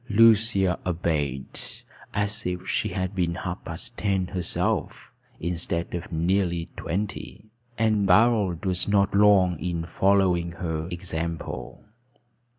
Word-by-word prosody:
Lucia 105 -4 +4
obeyed, 75 -6 -2 0.5
as 105 +1 -1
if 90 0 -4
she - - 0
had 95 +1 -3
been 85 -3 0
half - - -5
past - - -7
ten 95 -3 +1
herself, 90 -1 -2 0.3
instead 85 0 -2
of 85 0 -5
nearly 85 0 0
twenty; 100 +2 -4 0.3
and 110 -3 +2
Barold 105 -3 +3
was 90 -1 0
not 100 -1 +2
long 100 -4 +5
in 85 -2 -3
following 90 -1 +2
her 80 -2 -3
example. 85 -2 -5
90 Hz, 115 wpm, -25 LUFS, 85-100 Hz, 0.5 s, long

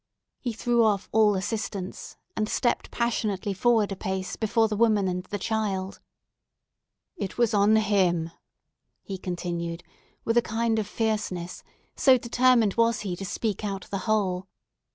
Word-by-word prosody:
He 245 - -3
threw 235 +1 +2
off 205 -3 +1
all 215 -2 +4
assistance, 195 -1 -4 0.2
and 215 -1 -1
stepped 240 - 0
passionately 215 -4 -1
forward 215 +1 +2
a - - -2
pace 190 0 -3
before 225 0 +2
the 215 - -2
woman 215 -3 +3
and 180 0 -2
the 205 - -4
children. 200 -2 -2 1.2
"It 195 - -5
was 235 -3 +2
on 205 +1 +4
him!" 185 -6 +2 0.7
he 195 -2 -6
continued, 170 -2 -4 0.4
with 230 +1 +1
a - - +7
kind 225 0 0
of 210 - -2
fierceness; 210 -6 -2 0.3
so 260 -2 +5
determined 240 -3 +3
was 230 -1 +3
he 190 -4 -3
to 195 - -6
speak 210 +1 -2
out 195 -2 -4
the 195 - -1
whole. 190 -3 +1
210 Hz, 150 wpm, -26 LUFS, 190-225 Hz, 1.2 s, a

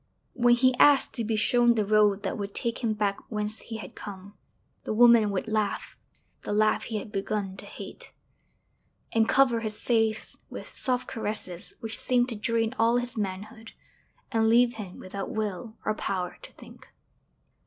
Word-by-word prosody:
When 240 -1 +4
he 255 +1 +4
asked 285 -2 +5
to 235 - -3
be 225 0 -1
shown 240 +2 +3
the 215 -2 +1
road 210 -1 +3
that - - -2
would 200 -1 -5
take 235 -2 -1
him 230 -3 0
back 205 -2 0
whence 210 0 -2
he 225 - -7
had 190 -4 -9
come, 200 0 -9 0.5
the - - -3
woman 235 -2 +6
would 200 +2 -2
laugh 215 -2 -2 0.5
the - - -5
laugh 215 +1 +2
he 225 - -3
had 210 - -7
begun 195 -1 -2
to - - -7
hate, - - -10 1.0
and 225 0 +2
cover 260 -4 +4
his 215 -2 -3
face 225 -2 +1
with - - -8
soft 250 -2 0
caresses 205 -5 -3
which 225 0 -5
seemed 250 0 +2
to 235 - -3
drain 225 +1 0
all 230 +2 +4
his 245 0 -3
manhood 210 +2 -5 0.6
and 225 -1 +2
leave 240 +1 +4
him 195 -4 -7
without 195 +1 -6
will 215 +1 -4
or 215 - +1
power 185 -4 -3
to - - -11
think. - - -15
220 Hz, 175 wpm, -27 LUFS, 205-235 Hz, 1.0 s, woman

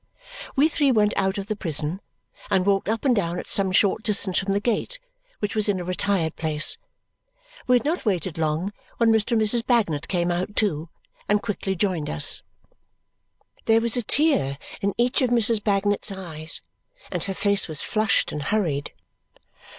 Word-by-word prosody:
We 285 +3 +5
three 290 -3 +2
went 210 -3 +3
out 190 +1 0
of 200 - -4
the 215 +1 -3
prison 165 -1 -2 0.5
and 185 -1 +2
walked 200 0 +1
up 225 +3 -2
and 255 -3 +4
down 175 -4 -1
at - - -6
some 195 -2 +2
short 200 +2 +3
distance 200 -4 +1
from 195 0 -2
the 200 - +1
gate, 240 - -2 0.4
which 210 - -3
was 215 -1 +2
in 195 -2 +1
a - - -4
retired 180 -2 -1
place. 155 -1 +1 0.9
We 250 - +5
had 245 - +1
not 325 +4 -1
waited 180 -5 -1
long 160 +5 -1 0.2
when 230 -1 +4
Mr. 220 +2 +1
and 225 - +3
Mrs. 230 +2 +2
Bagnet 205 - +1
came 175 -1 0
out 185 +4 -3
too 165 -6 0 0.4
and 210 0 +4
quickly 200 -2 -3
joined 180 -5 -1
us. 75 0 +2 1.2
There 225 0 +4
was 230 +1 +2
a 245 - +2
tear 230 - +1 0.2
in 200 -1 -1
each 245 +3 +1
of 255 - +2
Mrs. 230 -2 +2
Bagnet's 205 0 +1
eyes, 160 -5 -3 0.5
and - - -1
her 195 -1 -4
face 200 0 +2
was 155 -3 0
flushed 215 -2 +1
and 150 - -4
hurried. 145 -4 -1
200 Hz, 180 wpm, -24 LUFS, 175-220 Hz, 1.2 s, We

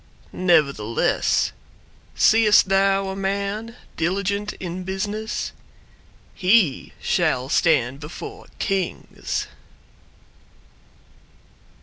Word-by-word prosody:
Nevertheless 140 - +2 0.6
Seest 215 -3 +5
thou 195 0 +2
a 190 - -4
man 200 +4 -3 0.2
diligent 200 +4 -1
in 180 0 -6
business? 205 +4 -3 0.8
He 185 - +2
shall 155 -9 0
stand 140 -5 +2
before 405 - -9
Kings! 195 -3 -2
195 Hz, 65 wpm, -22 LUFS, 165-205 Hz, 0.8 s, Seest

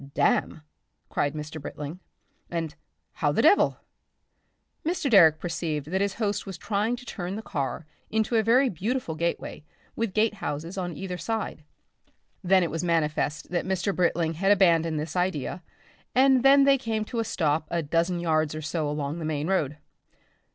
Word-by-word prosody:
"Damn!" 155 - +1 0.5
cried 145 +1 -1
Mr. 150 0 -6
Britling, 150 +4 -7 0.5
and 165 -3 -3 0.4
"How - - 0
the - - +1
devil?" 405 - +5 1.1
Mr. 315 -4 -1
Direck 165 -7 +7
perceived 155 -3 -3
that 190 +1 +1
his 200 -1 0
host 205 -4 -2
was 190 -3 -6
trying 210 +6 -1
to 250 +1 -12
turn 180 -4 -5
the 220 - -6
car 145 -3 -3 0.2
into 220 +2 0
a 225 - +5
very 245 +5 +4
beautiful 215 0 -2
gateway, 170 -1 -3 0.3
with 225 -4 -2
gate 215 0 +3
houses 165 -3 -5
on 175 -5 -4
either 180 -2 -5
side. 220 -8 -3 0.8
Then 185 0 +4
it 170 - -2
was 165 +2 -3
manifest 155 -2 0
that 175 - 0
Mr. 190 +1 0
Britling 170 -2 +1
had 195 +5 +2
abandoned 165 -5 +3
this 155 +2 -5
idea, 180 -2 -1 0.5
and 265 0 +5
then 275 +2 +7
they 275 -1 +5
came 220 -4 -2
to 235 +1 -4
a - - +2
stop 155 -7 0
a 170 -1 -1
dozen 165 +4 0
yards 155 -2 +1
or 155 - -4
so 150 0 -2
along 150 +2 -3
the - - -5
main 150 -1 -1
road. 155 -6 0
175 Hz, 170 wpm, -26 LUFS, 155-210 Hz, 1.1 s, Direck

